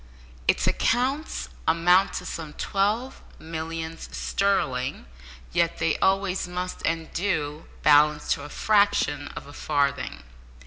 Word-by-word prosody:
Its - - +3
accounts 265 +6 0 0.2
amount 180 +4 +4
to - - -4
some 155 -2 -6
twelve 210 +6 -1 0.2
millions 160 0 -5
sterling, 135 - 0 0.5
yet 170 0 +2
they 165 -1 +1
always 195 -1 +1
must, 180 +1 -4
and 165 -1 -2
do, 160 -5 -2 0.2
balance 150 0 +5
to - - -6
a 145 - -8
fraction 200 -9 +2
of - - -7
a 145 - -12
farthing. 145 - -1
165 Hz, 120 wpm, -26 LUFS, 150-195 Hz, 0.5 s, balance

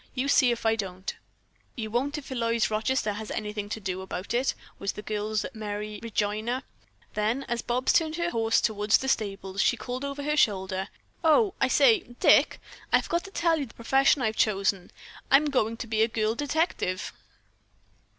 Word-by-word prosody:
You 260 +1 -1
see 260 -3 +5
if 235 -1 -4
I 225 0 +4
don't." 190 -3 -5 0.6
"You 220 -3 -5
won't 275 +6 0
if 280 -2 -9
Eloise 230 -3 0
Rochester 215 0 0
has 215 +1 -7
anything 210 -1 -4
to 220 - -4
say 190 - 0
about 190 +1 -5
it," 250 +3 +1 0.2
was 200 0 -2
the 210 - -8
girl's 215 0 -2
merry 210 -1 -5
rejoinder. 220 +3 -1 0.5
Then 220 +6 0
as 240 -2 -2
Bobs 250 +2 +1
turned 315 -2 +2
her 340 +1 -1
horse 225 0 +2
toward 210 -1 -1
the 265 +5 +4
stables, 195 -5 -1
she 240 - +3
called 250 +4 -5
over 280 0 -4
her 300 +1 0
shoulder: 190 -7 +1 0.4
"O, 365 +5 +4
I - - +5
say, 450 -4 +5 0.2
Dick, - - +5 0.3
I - - +6
forgot 340 +2 -2
to - - -8
tell 335 -3 +1
you 280 - -3
the - - -18
profession 270 +3 +3
I've 220 -1 0
chosen. 195 -3 +1 0.4
I'm 290 +2 +5
going 230 -4 +1
to 225 -2 -4
a 225 - +5
girl 220 -1 0
detective." 290 - -1
225 Hz, 180 wpm, -27 LUFS, 210-270 Hz, 0.6 s, I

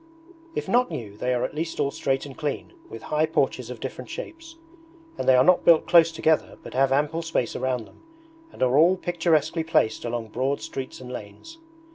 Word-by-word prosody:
If - - -3
not 250 +1 +3
new 115 -11 -6
they 125 +4 -2
are 125 -1 0
at - - -3
least 160 +2 -4
all 140 -1 +1
straight 135 0 -1
and 140 -2 -10
clean, 150 - -4 0.2
with - - -9
high 155 +1 +1
porches - - -1
of - - -7
different - - -7
shapes; 330 -8 -8 0.6
and - - -1
they 130 - +7
are 125 - +6
not 180 +3 +4
built 165 -2 +5
close 165 -2 +6
together 160 -1 0
but - - -10
have 135 +1 +2
ample 150 +4 +1
space 165 -8 -2
around 125 -3 -2
them, - - -20 0.5
and - - -3
are 130 +3 +4
all 175 +4 +5
picturesquely 165 -3 0
placed 160 -9 +1
along 120 -1 -4
broad 130 +5 -1
streets 130 -1 -7
and 125 0 -9
lanes. 125 - -10
150 Hz, 200 wpm, -25 LUFS, 130-165 Hz, 0.6 s, they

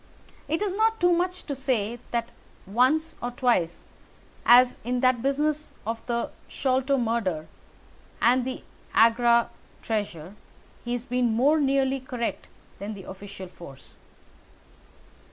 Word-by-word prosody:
It 325 +6 0
is 400 -3 -1
not 445 +2 +2
too 355 0 +4
much 360 +1 0
to 285 - -4
say 240 -4 -1
that 235 -1 -2 0.3
once 260 - +2
or 245 - -2
twice, 240 -10 0 0.6
as 250 +1 +7
in 245 +2 -1
that 255 -2 +3
business 295 +3 0
of 225 +1 -3
the 235 -1 -1 0.2
Sholto 265 +1 +1
murder 220 -10 -1 0.7
and 250 +1 +4
the 255 +1 -5 0.3
Agra 235 +1 +4 0.3
treasure, 200 -6 -3 0.5
he 240 - -3
has 245 0 -3
been 245 -1 +1
more 275 +8 +3
nearly 270 -1 +2
correct 250 -2 -4 0.3
than 210 +2 -5
the 195 - -10
official 190 0 -9
force." 155 -6 -13
245 Hz, 130 wpm, -26 LUFS, 225-275 Hz, 0.7 s, as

